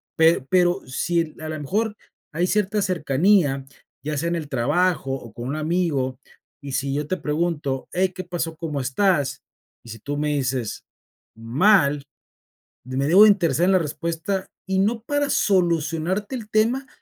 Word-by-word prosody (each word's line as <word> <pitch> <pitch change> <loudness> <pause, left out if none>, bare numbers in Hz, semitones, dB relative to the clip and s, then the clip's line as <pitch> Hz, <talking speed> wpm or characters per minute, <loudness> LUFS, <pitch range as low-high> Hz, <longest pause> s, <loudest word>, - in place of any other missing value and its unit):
pe 160 -5 +3
pero 180 -1 +3
si, 165 +4 -1
a 155 - -5
lo 155 - -4
mejor, 210 +9 -1 0.4
hay 175 +3 +1
cierta 210 +1 +1
cercanía, 160 -4 +2 0.4
ya 150 +1 -3
sea 165 +4 -1
en 170 - -1
el 155 - -5
trabajo 145 +3 +1
o 120 -5 -7
con 120 +3 -6
un 145 - -2
amigo, 155 -6 -1 0.4
y 140 -1 -7
si 135 0 -1
yo 150 +1 -2
te 185 - -1
pregunto: 150 -4 -2
"Hey, 185 +1 +1
¿qué 185 - -6
pasó? 170 -2 -4
¿Cómo 155 -3 -4
estás?", 135 0 +1 0.4
y 115 - -13
si 115 0 -8
tú 145 +6 -4
me 150 +1 0
dices: 130 -5 -2 0.5
"Mal", 140 - +3 0.8
de 130 +1 -5
me 140 +1 +1
debo 185 +7 +8
de 215 - +8
interesar 175 -4 +2
en - - +4
la 185 - +5
respuesta 170 +5 -3 0.2
y 190 0 +1
no 220 +4 +1
para 290 +4 -1
solucionarte 175 - +1
el 220 -4 -7
tema, 240 +6 +1
165 Hz, 170 wpm, -23 LUFS, 140-190 Hz, 0.8 s, debo